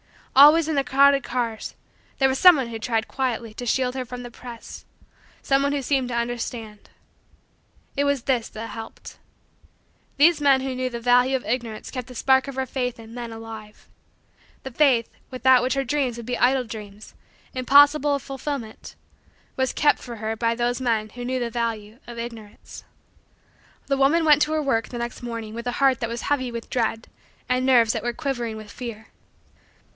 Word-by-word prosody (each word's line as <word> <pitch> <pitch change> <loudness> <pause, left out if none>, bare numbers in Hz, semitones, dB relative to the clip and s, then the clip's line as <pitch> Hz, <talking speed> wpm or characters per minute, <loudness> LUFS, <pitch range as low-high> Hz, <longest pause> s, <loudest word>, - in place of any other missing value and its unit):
Always, 300 +4 +8
in 320 - -1
the 280 -2 +1
crowded 275 +1 +4
cars, 235 -3 -3 0.4
there 270 -1 +3
was 265 - -1
some 360 -2 +9
one 260 -5 -2
who 225 -1 -6
tried 225 -1 -1
quietly 240 -4 -3
to 245 - -7
shield 250 +1 +1
her 260 -1 -4
from 245 0 -8
the 245 - -9
press 235 -1 -10 0.6
some 270 0 +2
one 280 0 +1
who 280 -1 -2
seemed 265 -1 0
to 245 - -4
understand. 235 -2 -4 1.1
It 285 - +1
was 285 -3 0
this 250 -4 0
that 225 +1 -7
helped. 225 -1 -10 1.0
These 310 +2 +5
men 275 -2 +4
who 265 0 -3
knew 255 0 -2
the 235 -1 -6
value 245 +2 +4
of 260 - -3
Ignorance 230 -2 -3
kept 255 -3 -5
the 250 - -11
spark 265 +3 +3
of 275 - -6
her 265 0 -1
faith 250 -1 -3
in 225 0 -12
men 240 -1 -6
alive. 225 -1 -10 0.8
The 265 - -7
faith, 250 -4 +3 0.2
without 255 0 +4
which 255 +2 0
her 275 - 0
dreams 260 -2 -1
would 235 - -8
be 245 +1 -2
idle 255 +1 +3
dreams, 210 -3 -10 0.4
impossible 285 +3 +5
of 280 - -5
fulfillment, 270 -4 -6 0.6
was 260 -1 0
kept 295 - +3
for 240 -2 -8
her 220 0 -3
by 230 +1 0
those 245 +1 -1
men 225 -4 0
who 245 +3 -8
knew 255 +1 -1
the 240 -1 -3
value 225 -1 -3
of 240 -1 -9
Ignorance. 230 -3 -9 1.0
The 275 - 0
woman 300 +5 +3
went 300 -1 +5
to 310 - -2
her 310 -1 0
work 230 -5 0
the 245 - -6
next 235 +1 -5
morning 230 -3 -6
with 235 +2 -6
a 245 - -1
heart 270 -1 +2
that 230 - -3
was 235 0 -5
heavy 260 -4 -1
with 235 -1 -7
dread 225 -2 -1 0.4
and 255 0 +1
nerves 240 -4 +4
that - - -3
were 240 0 -2
quivering 240 -5 -3
with 215 -1 -10
fear. 225 -3 -8
245 Hz, 190 wpm, -24 LUFS, 230-270 Hz, 1.1 s, some